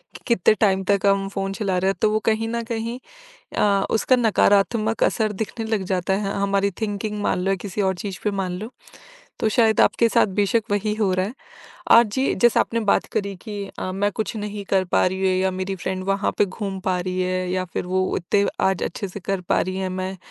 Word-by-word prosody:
कि - - -10
कितने 225 -4 +4
टाइम 195 -3 +3
तक 200 0 +1
हम 195 0 +3
फ़ोन 195 -1 -3
चला 195 -2 -1
रहे 190 +1 +1
हैं। - - -5
तो 215 - +4
वो 215 - +2
कहीं 225 0 +1
न 235 0 -2
कहीं 230 +1 -4 0.6
अ, 200 -1 +3
उसका 225 +3 +3
नकारात्मक 220 -1 +2
असर 215 -2 +1
दिखने 225 +1 -4
लग 220 -3 -1
जाता 185 +1 0
है। 195 0 -1
हमारी 200 0 +1
थिंकिंग 210 0 -2
मान 185 - 0
लो 190 +2 -1
या - - +2
किसी 205 0 -3
और 190 -1 +1
चीज़ 190 +1 -6
पे 210 - +1
मान 185 -2 -2
लो। 215 +3 -6 0.7
तो - - +2
शायद 220 0 +3
आपके 230 - +4
साथ - - +3
बेशक 205 +3 +2
वही 205 +1 0
हो 210 -3 +1
रहा 185 +1 0
है। 220 - -7 0.6
आज 235 -1 +8
जी 265 0 +1
जैसे 240 +3 +4
आपने 230 - 0
बात 210 -3 +2
करी 200 -1 -2
कि 205 +1 -6
अ, 185 - -3
मैं 200 +2 0
कुछ 220 +1 -3
नहीं 205 -1 -5
कर 190 -1 +3
पा 180 - +2
रही 190 +1 -1
हूँ। 190 -1 +2
या 190 - +2
मेरी 185 +1 -3
फ्रेंड 185 +1 -4
वहाँ 195 +1 0
पे - - +5
घूम 195 0 -5
पा 185 -1 0
रही 185 +1 -2
है। 185 0 -1
या 185 0 -1
फिर - - -3
वो 185 +1 +1
इतने 200 +3 +1 0.2
आज 190 -2 0
अच्छे 200 +3 -3
से 195 +2 -8
कर 195 +1 -2
पा 180 - +1
रही 185 +1 -2
है। 190 0 -2
मैं 185 +1 -4
200 Hz, 230 wpm, -22 LUFS, 185-215 Hz, 0.7 s, आज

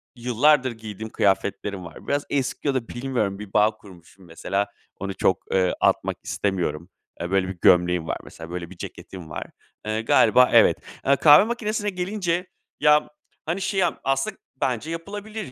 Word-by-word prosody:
yıllardır 125 +3 +3
giydiğim 110 -1 -8
kıyafetlerim 100 -1 0
var. 85 - -12
Biraz 145 0 0
eski 135 +1 -2
ya 140 - +2
da 125 -3 -2
bilmiyorum 120 -6 -2
bir 105 -2 -9
bağ 105 +1 +4
kurmuşum 95 -1 -17
mesela. 95 +4 -2 0.3
Onu 95 0 -4
çok, 95 - +1
eee, 95 -1 +2
atmak - - +1
istemiyorum. 90 -4 -2 0.3
Eee, 85 +2 -4
böyle 95 -1 +2
bir 95 -1 -6
gömleğim 90 -1 +4
var - - -2
mesela. 80 0 -11
Böyle 90 -1 -5
bir 95 - -13
ceketim 90 -1 -9
var. 75 - -6 0.4
Eee, 110 +1 -1
galiba 115 +2 +5
evet. - - +6 0.3
Eee, 140 +1 +5
kahve 150 +6 +7
makinesine 215 -3 -2
gelince, 180 -1 -2 0.3
ya 150 0 +4 0.4
hani 170 +5 -2
şey, 195 0 0 0.2
aslında 135 0 -1 0.2
bence 130 +5 -1
yapılabilir 205 +2 -6
110 Hz, 160 wpm, -24 LUFS, 95-150 Hz, 0.4 s, kahve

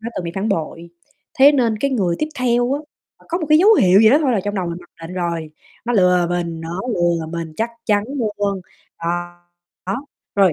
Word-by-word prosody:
đã 230 +1 -5
từng 180 - -3
bị 170 - -3
phản 200 +3 -2
bội, 170 -2 -3 0.5
thế 280 +2 +8
nên 235 -6 +1
cái 275 +3 0
người 185 -9 0
tiếp 305 - -1
theo 245 0 +1
á, 285 - -1 0.4
là - - -22
có 340 - -1
một 315 - -3
cái 305 - +6
dấu 415 +6 +6
hiệu 190 - +5
gì 220 0 +7
đó 285 - +6
thôi 270 -5 +2
là 205 - +1
trong 205 0 -2
đầu 185 -3 -2
mình 170 0 -4
mặc 175 - -18 0.2
định 180 - -8
rồi, 170 -3 -3 0.3
"Nó 245 - -1
lừa 180 -4 +4
mình, 170 -2 -2
nó 165 +3 -5
lừa 170 -2 0
mình, 165 -1 -5
chắc 230 +1 -1 0.2
chắn 205 -1 +2 0.3
luôn." 200 -1 -1 0.4
Ờ, 165 - -4 0.8
đó, 240 +10 -3 0.3
rồi 195 -3 +4
195 Hz, 230 wpm, -20 LUFS, 170-245 Hz, 0.8 s, thế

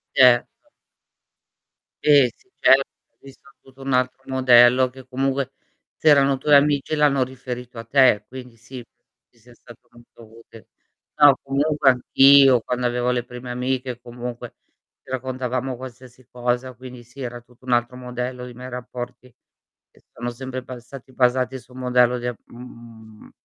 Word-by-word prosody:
Certo. 125 -2 +5 1.5
Sì, 145 -3 +6
sì, 385 - -33
certo 135 +1 +5 0.4
visto 135 0 -17
tutto 135 0 -20
un 135 -1 -3
altro 130 +1 0
modello 130 -1 +5
che 130 0 -15
comunque 135 +1 -2 0.4
se 160 - 0
erano 140 -2 +4
tuoi 145 +2 +4
amici 145 +1 +1
l'hanno 145 -3 +2
riferito 125 -2 -7
a 115 - -7
te, 125 -3 +3
quindi 125 -2 -11
sì, 120 +2 -11
penso 120 +1 -52 0.2
ti 120 - -30
sia 120 +1 -20
stato 120 0 -18
molto 115 -1 -18
utile. 115 -1 -17 0.5
No, 145 -2 +7
comunque 140 0 +1
anch'io 135 +1 +5
quando 125 +1 -3
avevo 125 +1 0
le 120 - -1
prime 125 +1 -9
amiche 125 0 -3
comunque, 120 0 -8 0.5
ci - - -19
raccontavamo 130 0 -3
qualsiasi 125 0 -13
cosa, 125 +1 -3
quindi 125 0 -12
sì, 125 +4 -15
era 120 -1 -6
tutto 125 +1 -23
un 125 - -5
altro 120 +1 +1
modello 125 0 -6
dei 125 - -11
miei 125 +1 -9
rapporti 125 0 -8 0.6
che - - -26
si - - -43
sono 120 0 -5
sempre 130 +1 -7
bastati 130 +1 -11
basati 125 +1 +1
su 125 - -22
un 125 - -12
modello 125 -1 +2
di 120 - -6
a 120 - -3
mhmm, 115 -3 -14
125 Hz, 160 wpm, -22 LUFS, 120-130 Hz, 1.5 s, No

